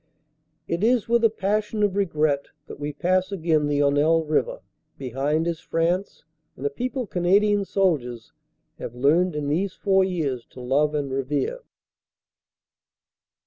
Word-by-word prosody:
It 170 Hz, +4 st, -2 dB
is 235 Hz, -1 st, +3 dB
with 235 Hz, 0 st, +2 dB
a 225 Hz, -, +6 dB
passion 210 Hz, +1 st, -1 dB
of 200 Hz, -2 st, +1 dB
regret 155 Hz, -7 st, +1 dB, 0.2 s
that -, -, -10 dB
we 145 Hz, 0 st, -3 dB
pass 185 Hz, +5 st, 0 dB
again 160 Hz, -5 st, +1 dB
the 145 Hz, 0 st, +1 dB
Honelle 145 Hz, +3 st, +3 dB
River. -, -, -1 dB, 0.4 s
Behind 140 Hz, +5 st, -1 dB
is 170 Hz, -2 st, -2 dB
France 175 Hz, +5 st, -1 dB, 0.3 s
and 135 Hz, -, -7 dB
a 140 Hz, -, +1 dB
people 250 Hz, -, -3 dB
Canadian 200 Hz, +3 st, +2 dB
soldiers 140 Hz, -, -1 dB, 0.5 s
have 120 Hz, -, -6 dB
learned 155 Hz, +7 st, +2 dB
in 150 Hz, -1 st, -2 dB
these 180 Hz, +6 st, 0 dB
four 190 Hz, -2 st, +3 dB
years 155 Hz, -10 st, -2 dB
to -, -, -14 dB
love 145 Hz, +4 st, +1 dB
and 140 Hz, -2 st, -2 dB
revere. 140 Hz, -, -1 dB
165 Hz, 145 wpm, -24 LUFS, 145-195 Hz, 0.5 s, a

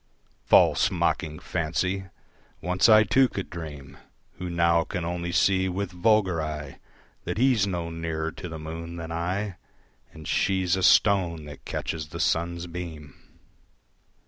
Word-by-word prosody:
False -, -, +5 dB
mocking 75 Hz, 0 st, -1 dB
fancy! 90 Hz, +4 st, -2 dB, 0.5 s
Once 90 Hz, +5 st, +2 dB
I 110 Hz, 0 st, +8 dB
too 130 Hz, +5 st, +3 dB
could 95 Hz, -, -6 dB
dream, 75 Hz, -5 st, -8 dB, 0.4 s
Who 90 Hz, -1 st, -4 dB
now 85 Hz, -1 st, +3 dB
can 90 Hz, -1 st, -4 dB
only 85 Hz, 0 st, -3 dB
see 95 Hz, +1 st, +2 dB
with 95 Hz, +1 st, -3 dB
vulgar 95 Hz, -2 st, +2 dB
eye 75 Hz, -3 st, -6 dB, 0.5 s
That 90 Hz, +3 st, -3 dB
he's 120 Hz, -5 st, +3 dB
no 85 Hz, -3 st, -3 dB
nearer 80 Hz, -1 st, -3 dB
to 90 Hz, -, -8 dB
the 80 Hz, -, -6 dB
moon 80 Hz, +2 st, -7 dB
than 85 Hz, -1 st, -6 dB
I 90 Hz, +4 st, -2 dB, 0.5 s
And 80 Hz, -1 st, -11 dB
she's 95 Hz, 0 st, +1 dB
a 95 Hz, -, -2 dB
stone 90 Hz, -5 st, +4 dB
that 75 Hz, -2 st, -11 dB
catches 80 Hz, -2 st, -4 dB
the 85 Hz, +3 st, -8 dB
sun's 85 Hz, +1 st, 0 dB
beam. 85 Hz, -5 st, -7 dB
85 Hz, 145 wpm, -26 LUFS, 80-95 Hz, 0.5 s, I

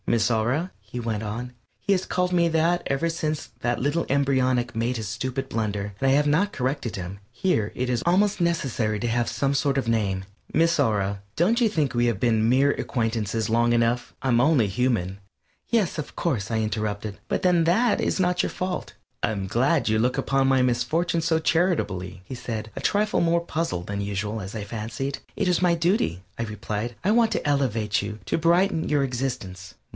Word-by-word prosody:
"Miss 115 Hz, 0 st, +2 dB
Aura," 125 Hz, +11 st, 0 dB
he 100 Hz, +5 st, -7 dB
went 115 Hz, -3 st, -2 dB
on, 115 Hz, +4 st, -5 dB, 0.3 s
he 200 Hz, -, +1 dB
has 185 Hz, -1 st, -1 dB
called 180 Hz, 0 st, 0 dB
me 170 Hz, -1 st, +3 dB
that 165 Hz, +2 st, +2 dB
ever 135 Hz, +5 st, 0 dB
since 155 Hz, -2 st, -2 dB
that 120 Hz, 0 st, 0 dB
little 145 Hz, +6 st, 0 dB
embryonic 130 Hz, -3 st, +1 dB
made 115 Hz, +2 st, 0 dB
his 110 Hz, -2 st, -4 dB
stupid 130 Hz, +5 st, -3 dB
blunder, 105 Hz, -3 st, -2 dB
and 135 Hz, -, +3 dB
I -, -, +5 dB
have 145 Hz, +1 st, +3 dB
not 160 Hz, +8 st, +2 dB
corrected 130 Hz, -2 st, -2 dB
him 95 Hz, +1 st, -6 dB
here 120 Hz, -, 0 dB
it 125 Hz, -, -1 dB
is 120 Hz, -2 st, 0 dB
almost 195 Hz, +3 st, +2 dB
necessary 130 Hz, -11 st, 0 dB
to 120 Hz, -, -1 dB
have 120 Hz, +1 st, 0 dB
some 140 Hz, 0 st, 0 dB
sort 140 Hz, 0 st, +1 dB
of 135 Hz, -, 0 dB
a -, -, +2 dB
name 95 Hz, -4 st, 0 dB, 0.3 s
"Miss 165 Hz, 0 st, +3 dB
Aura, 100 Hz, -6 st, +1 dB
don't 220 Hz, +9 st, +2 dB
you 230 Hz, -, +4 dB
think 150 Hz, -, 0 dB
we 120 Hz, 0 st, +2 dB
have 115 Hz, -5 st, 0 dB
been 110 Hz, -1 st, +2 dB
mere 135 Hz, +3 st, +4 dB
acquaintances 115 Hz, -5 st, -1 dB
long 120 Hz, +1 st, +3 dB
enough? 120 Hz, +1 st, +1 dB
I'm 120 Hz, -3 st, +3 dB
only 140 Hz, -6 st, +4 dB
human 100 Hz, -3 st, 0 dB, 0.2 s
" -, -, -41 dB
"Yes, 215 Hz, -8 st, +1 dB
of 150 Hz, -, -6 dB
course," 120 Hz, -, -1 dB
I 115 Hz, -, 0 dB
interrupted, 105 Hz, -1 st, -3 dB
"but -, -, -1 dB
then 175 Hz, -3 st, +4 dB
that 210 Hz, +7 st, +3 dB
is -, -, 0 dB
not 180 Hz, -1 st, +2 dB
your -, -, 0 dB
fault 185 Hz, 0 st, -4 dB, 0.2 s
" -, -, -45 dB
"I'm 105 Hz, -2 st, -1 dB
glad 135 Hz, -, +2 dB
you 110 Hz, 0 st, +2 dB
look 125 Hz, +3 st, +1 dB
upon 135 Hz, -1 st, +1 dB
my 135 Hz, -1 st, +4 dB
misfortune 155 Hz, +8 st, +1 dB
so 160 Hz, 0 st, +2 dB
charitably," 100 Hz, -, 0 dB
he 130 Hz, -, -7 dB
said, 110 Hz, -3 st, -5 dB
a -, -, -5 dB
trifle 210 Hz, +1 st, +1 dB
more 170 Hz, 0 st, +3 dB
puzzled 165 Hz, -, -3 dB
than 100 Hz, 0 st, -3 dB
usual, 105 Hz, +2 st, -3 dB
as 95 Hz, +3 st, -7 dB
I 105 Hz, -, -3 dB
fancied. 115 Hz, +6 st, -4 dB, 0.2 s
"It -, -, 0 dB
is 180 Hz, -1 st, +2 dB
my 175 Hz, -2 st, +4 dB
duty," 165 Hz, -, 0 dB, 0.2 s
I -, -, 0 dB
replied. 105 Hz, +1 st, -4 dB
"I 200 Hz, -, +3 dB
want 230 Hz, 0 st, +4 dB
to -, -, -2 dB
elevate 115 Hz, -7 st, +1 dB
you; 105 Hz, +1 st, -5 dB
to -, -, 0 dB
brighten 170 Hz, +1 st, +2 dB
your 145 Hz, -2 st, +2 dB
existence." 120 Hz, -9 st, -4 dB
125 Hz, 200 wpm, -25 LUFS, 110-165 Hz, 0.3 s, I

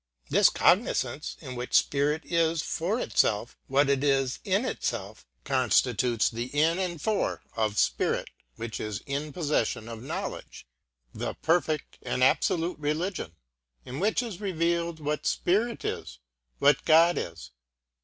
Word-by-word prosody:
This -, -, +6 dB
cognisance -, -, +1 dB
in 130 Hz, -, -7 dB
which 125 Hz, 0 st, -3 dB
spirit 145 Hz, +3 st, +2 dB
is 165 Hz, -2 st, +1 dB
for 190 Hz, +9 st, -1 dB
itself 110 Hz, -, +1 dB
what 140 Hz, +2 st, +3 dB
it 140 Hz, 0 st, +1 dB
is 135 Hz, -2 st, +1 dB
in 200 Hz, +4 st, +1 dB
itself -, -, -4 dB, 0.2 s
constitutes 125 Hz, -2 st, +2 dB
the 120 Hz, +1 st, -3 dB
in 165 Hz, +4 st, +3 dB
and 175 Hz, -3 st, -2 dB
for 215 Hz, +7 st, -1 dB
of 110 Hz, -2 st, 0 dB
spirit -, -, +1 dB, 0.2 s
which 115 Hz, -1 st, -5 dB
is 105 Hz, -1 st, -4 dB
in 145 Hz, +2 st, -3 dB
possession 145 Hz, -8 st, -1 dB
of 115 Hz, -1 st, -7 dB
knowledge, 130 Hz, -, -6 dB, 0.5 s
the -, -, -4 dB
perfect 160 Hz, -2 st, 0 dB
and 125 Hz, 0 st, -1 dB
absolute 165 Hz, +5 st, +2 dB
religion, 150 Hz, -, -2 dB, 0.5 s
in 130 Hz, -, -6 dB
which 215 Hz, +6 st, +1 dB
is 215 Hz, -5 st, -7 dB
revealed 170 Hz, -3 st, -1 dB
what 150 Hz, 0 st, -2 dB
spirit 220 Hz, +7 st, 0 dB
is, -, -, -4 dB, 0.4 s
what 145 Hz, +1 st, +4 dB
God 165 Hz, +2 st, +6 dB
is. -, -, -7 dB
150 Hz, 135 wpm, -28 LUFS, 125-170 Hz, 0.5 s, This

